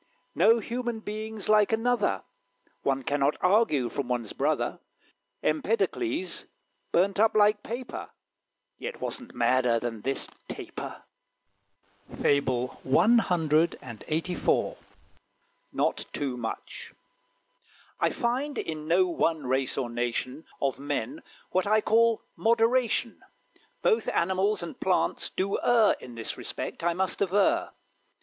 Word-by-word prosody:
No 220 +7 +5
human 235 0 -3
being's 215 0 -5
like 215 0 +4
another: 225 - +1 0.6
One 135 -1 0
cannot 145 +2 +1
argue 180 - +3
from 135 +1 -3
one's 120 -3 -2
brother. - - 0 0.6
Empedocles 230 - -1 0.5
burnt 195 +3 +2
up 220 0 +4
like 210 0 +4
paper; 240 +4 -6 0.7
Yet 485 - -6
wasn't 250 -2 -6
madder 120 0 +3
than 115 -2 -4
this 135 +4 -1 0.2
Taper. - - -7 1.2
FABLE 130 -3 +1
CLXXXIV. 160 - +1 0.9
"NOT - - +1
TOO 135 -4 -2
MUCH." 115 -2 -6 1.1
I - - +3
Find 260 +5 -1
in 155 -1 -4
no 180 +3 +4
one 165 -3 0
race 130 +1 0
or 130 -3 -1
nation 120 +4 -3
Of 135 -1 -1
men 145 - -3 0.3
what 185 +1 +1
I 215 +1 +4
call 230 +1 +3
moderation; 230 +1 +2 0.6
Both 455 -2 +2
animals 190 +2 +1
and 170 - -7
plants 185 -1 +1
do 195 +1 -1
err 230 -3 +4
In 120 -2 -10
this 115 -1 -4
respect, - - -5
I 170 0 +1
must 190 +1 -1
aver. 205 - +2
185 Hz, 115 wpm, -28 LUFS, 135-225 Hz, 1.2 s, No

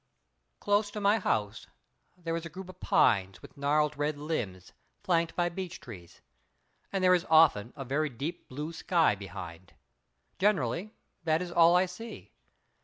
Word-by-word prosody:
Close 205 0 +1
to 210 - -6
my 205 +2 +3
house 105 - -1 0.5
there 165 -2 -3
is 165 - -3
a 170 - -6
group 185 +2 -9
of 185 0 -12
pines 95 -3 +2
with - - -13
gnarled 150 +1 +1
red 145 +1 -1
limbs 115 - -4 0.3
flanked 170 -2 +1
by 175 -1 +1
beech 180 0 -6
trees. 90 -8 -12 0.7
And 195 -1 -1
there 185 0 +6
is 180 0 +1
often 155 -9 +5
a 135 - -6
very 150 +4 0
deep 140 +7 -6
blue 150 +5 -5
sky 165 - +2
behind. 90 -3 -9 0.6
Generally, 190 - 0 0.3
that 160 0 +2
is 180 0 -5
all 170 0 +6
I 180 +1 +4
see. 225 +6 -9
160 Hz, 160 wpm, -30 LUFS, 125-180 Hz, 0.7 s, there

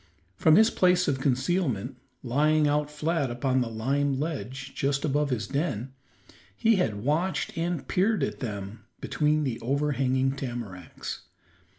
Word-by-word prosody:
From 155 - +5
his 220 +2 +6
place 180 -1 +3
of 135 -2 +1
concealment, 130 - 0 0.3
lying 150 +4 +3
out 145 0 +1
flat 150 -1 -1
upon 130 +2 0
the 120 - -1
lime 135 +5 0
ledge 135 -3 -4
just 140 +2 0
above 145 0 +1
his 115 -6 -1
den, 135 - -2 0.6
he 225 -2 +4
had 105 - -1
watched 155 +5 0
and 165 -2 -2
peered 195 -2 +2
at - - -2
them 100 -2 -6 0.2
between 150 0 +1
the 130 -5 -2
overhanging 135 0 +1
tamaracks. 120 -10 -6
140 Hz, 135 wpm, -27 LUFS, 125-155 Hz, 0.6 s, his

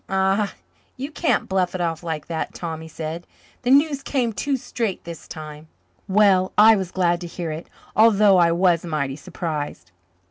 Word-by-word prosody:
"Ah, 195 +2 +1 0.4
you 275 +4 -5
can't 325 - 0
bluff 185 -1 0
it - - -3
off 165 -2 -1
like 160 -3 -4
that, 160 -1 -4
Tom," 165 -2 -5
he 160 - -9
said. 160 +2 -6 0.3
"The 245 - -2
news 285 +1 +4
came 245 -6 -1
too 275 +6 -1
straight 230 -5 -3
this 170 -2 -9
time. 155 -1 -9 0.4
Well, 190 -2 +4
I 220 +1 +8
was 190 -3 -3
glad 175 -2 +1
to 175 - -5
hear 170 -1 -5
it, 155 +2 -7 0.3
although 210 -3 +6
I 170 -1 +4
was 170 -1 +2
mighty 150 -5 -2
surprised. 145 - -5
180 Hz, 175 wpm, -22 LUFS, 160-210 Hz, 0.4 s, I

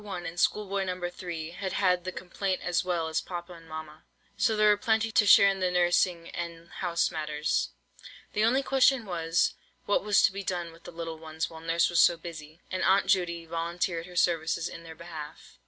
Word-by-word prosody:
1, 185 -4 -6
and 170 +1 -5
Schoolboy 200 0 +1
No. 185 -1 -3
3, 170 -3 -6
had 190 +2 -4
had 180 -2 +2
the 185 - -2
complaint 185 +1 -3
as 175 0 +1
well 175 -3 -1
as 160 - -1
papa 175 0 -7
and 165 -1 -14
mamma, 155 0 -8 0.3
so 220 +2 +2
there 215 0 +5
were 210 - +6
plenty 220 +1 +1
to 210 -1 +3
share 200 - +8
in 195 -1 +1
the 185 -1 +1
nursing 175 -1 +2
and 170 0 -6
house 170 -2 +1
matters. 150 -1 -1 0.6
The 210 - +1
only 255 +5 +3
question 265 -2 +3
was, 170 -2 +1 0.3
what 205 - +1
was 205 -1 +4
to - - +5
be 200 +1 -5
done 175 -3 -3
with 165 +1 -18
the - - -8
little 165 -1 -6
ones 160 0 -4
while 160 0 -10
Nurse 165 +1 +2
was 175 -2 +1
so 175 - +6
busy; 160 -1 -10
and 185 - -2
Aunt 195 +1 +4
Judy 170 -3 +1
volunteered 170 +1 -2
her 180 - -12
services 165 -1 +1
in - - -8
their 165 -1 -11
behalf. 160 -3 -10
175 Hz, 205 wpm, -28 LUFS, 165-190 Hz, 0.6 s, share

